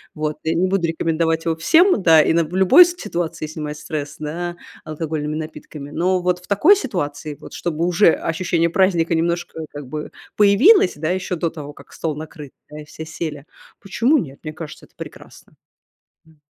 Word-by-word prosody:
Вот. 155 0 -3
Я 160 - 0
не 180 +3 +2
буду 190 -3 +1
рекомендовать 165 0 0
его 165 -1 0
всем, 325 - +4
да, 160 -2 +7
и - - +2
на 165 0 +2
в 165 +4 -8
любой 190 - +7
ситуации 175 - -4
снимать 150 -1 -6
стресс, 145 -1 -5
да, 170 +3 -4 0.3
алкогольными 155 -1 -4
напитками, 155 -2 -8
но 180 +3 0
вот 180 0 0
в 180 - -18
такой 295 - +5
ситуации, 150 - -4
вот, - - -11
чтобы 170 -1 -2
уже 175 0 +4
ощущение 170 0 0
праздника 170 -2 +2
немножко 170 0 -2
как 145 -2 -8
бы 150 +2 -6 0.3
появилось, 210 - +5
да, 155 +2 -3
еще 185 0 -2
до 170 0 -1
того, 150 -3 -9
как - - -17
стол 160 -3 -3
накрыт, 150 -2 -9 0.2
да, 150 0 -8
и - - -12
все 160 +1 -9
сели, 155 -3 -6 0.4
почему 235 +9 +2
нет? 140 - -5
Мне 155 -1 -6
кажется, 155 -1 -9
это - - -30
прекрасно. - - -12 0.7
М. 160 -1 -24
165 Hz, 180 wpm, -20 LUFS, 155-180 Hz, 0.7 s, да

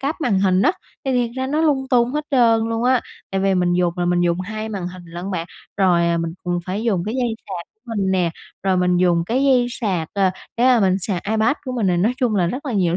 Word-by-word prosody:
cáp 295 +4 -2
màn 205 -9 +1
hình 190 -1 +3
á, - - +4 0.3
thì 265 - 0
thiệt 245 -2 +1
ra 260 0 -1
nó 300 +3 0
lung 275 -4 +2
tung 245 0 +3
hết 300 0 -2
trơn 230 -4 +3
luôn 230 +1 -1
á. 255 -1 +4 0.3
Tại 195 0 -1
vì 195 0 +2
mình 180 -1 +2
dùng 175 -1 +1
là 175 - +1
mình 175 0 +2
dùng 175 +1 +1
2 215 +3 -5
màn 190 -4 -4
hình 180 -1 -11
lận 175 +3 -7
bạn. 170 -2 -3 0.3
Rồi, 175 -3 +3
à, 170 0 +1
mình 165 0 -3
cũng 175 0 -1
phải 195 +4 -3
dùng 195 -7 0
cái 215 +3 -3
dây 240 -3 0
sạc 175 -3 -6 0.3
mình 190 -1 +1
nè, 180 -3 +1 0.3
rồi 190 -1 +2
mình 180 0 +2
dùng 175 -2 +2
cái 260 +4 +1
dây 255 -3 +4
sạc, 190 -10 -2
ờ, 195 -2 +3 0.3
cái 245 +2 +3
mà 250 -3 +5
mình 190 0 +3
sạc 185 -2 -2
iPad 220 +5 +2
của 255 - -4
mình 230 -5 0
này. 180 -1 +2
Nói 210 +8 +2
chung 240 -5 0
là 180 -3 +2
rất 260 - -4
là 255 - -2
nhiều 180 -4 +1
195 Hz, 270 wpm, -21 LUFS, 180-240 Hz, 0.3 s, mà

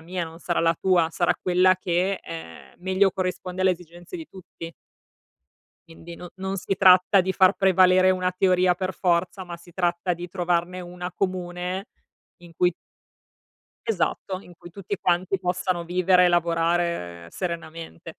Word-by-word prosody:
mia, 175 +1 -4
non 165 0 -11
sarà 175 - -1
la 165 0 +3
tua, 180 -3 +3
sarà 175 0 +2
quella 185 0 +3
che, 185 +2 0
ehm, 80 0 -10
meglio 190 +2 +2
corrisponde 185 0 -4
alle 185 0 +4
esigenze 175 - -7
di 325 -2 -8
tutti. 170 -3 -10 1.2
Quindi 165 +1 -11
no 180 +1 -10
non 190 +1 -4
si 190 +1 -2
tratta 185 +1 +6
di 190 +1 -1
far 190 +1 +4
prevalere 185 0 +4
una 185 -1 0
teoria 180 -1 +3
per 185 0 -4
forza, 180 +1 0
ma 175 -1 -7
si 170 0 -18
tratta 175 0 0
di 175 +1 -8
trovarne 175 0 -1
una 180 0 -7
comune 185 +1 -3 0.6
in 170 -1 -14
cui 180 -1 +3 1.1
Esatto, 195 - -1
in 175 -3 -15
cui 175 0 -13
tutti 200 +2 -5
quanti 185 +2 +1
possano 180 -1 -2
vivere 180 +1 +3
e - - +4
lavorare 170 - 0
serenamente. 165 - -7
180 Hz, 150 wpm, -24 LUFS, 170-185 Hz, 1.2 s, tratta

